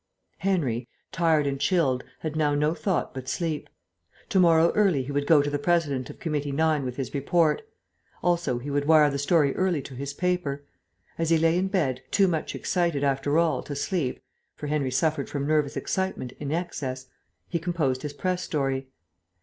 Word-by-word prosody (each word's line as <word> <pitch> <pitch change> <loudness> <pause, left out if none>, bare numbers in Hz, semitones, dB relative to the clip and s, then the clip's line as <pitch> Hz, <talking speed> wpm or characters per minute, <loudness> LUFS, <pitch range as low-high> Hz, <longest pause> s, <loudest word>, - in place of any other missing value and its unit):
Henry, 145 -11 0 0.2
tired 160 -3 +2
and 140 -1 -1
chilled, 140 -7 +2 0.2
had 155 -1 -4
now 150 -2 +2
no 150 +2 +2
thought 185 +1 -1
but 130 -1 -6
sleep. 160 -3 -2 0.6
To 200 -5 +3
morrow 170 -1 +5
early 190 -10 +2
he 135 - -6
would 145 0 -1
go 150 -3 +6
to 145 - -1
the 145 - -1
President 145 -6 0
of - - -9
Committee 150 -4 -2
9 155 0 +2
with 125 -1 -4
his 135 -1 -4
report. 155 +3 +2 0.6
Also 170 -8 +1
he 140 +4 -5
would 145 0 0
wire 155 -2 +6
the 140 - -2
story 145 -1 +3
early 185 -4 +1
to 135 - -9
his 140 +2 -5
paper. 180 -6 -1 0.6
As 165 -1 +1
he 165 - +5
lay 165 +1 +3
in 185 +2 +1
bed, 150 -10 0
too 195 -2 +4
much 165 -3 -2
excited, 170 -6 0
after 140 +2 +1
all, 165 -5 +2
to 145 - -6
sleep 145 -2 -1 0.4
(for - - -7
Henry 145 -2 0
suffered 145 +2 0
from 140 -1 -2
nervous 150 -1 +1
excitement 190 -10 -2
in 145 -1 -4
excess) 140 -6 -3 0.4
he 170 - -2
composed 160 -7 -1
his 150 -1 -5
press 180 +4 -1
story. 135 -5 -1
150 Hz, 185 wpm, -26 LUFS, 140-170 Hz, 0.6 s, go